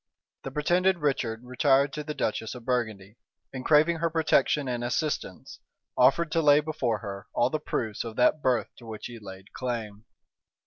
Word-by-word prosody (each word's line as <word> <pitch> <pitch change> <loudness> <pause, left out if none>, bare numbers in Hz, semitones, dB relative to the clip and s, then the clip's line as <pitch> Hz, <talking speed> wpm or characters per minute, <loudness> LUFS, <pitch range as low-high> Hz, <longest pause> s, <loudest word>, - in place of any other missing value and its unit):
The - - -5
pretended 175 +6 +2
Richard 125 -7 -1
retired 135 +2 +2
to 150 - -4
the 150 0 -5
duchess 110 +2 -2
of 120 -2 -10
Burgundy, 110 -5 -2 0.4
and 130 -1 -5
craving 155 +3 +4
her 165 +1 0
protection 150 -3 +2
and 120 -1 -2
assistance, 125 - -3 0.4
offered 150 +6 +4
to 165 - +2
lay 145 -1 +6
before 150 -7 -1
her 100 -2 -7
all 120 +2 +2
the 155 - -1
proofs 110 -7 -3
of 115 -2 -7
that 125 +5 +3
birth 125 -4 +1
to 120 - -13
which 110 -1 -7
he 120 -1 -8
laid 95 -2 -12
claim. 115 -4 -5
130 Hz, 175 wpm, -27 LUFS, 115-150 Hz, 0.4 s, lay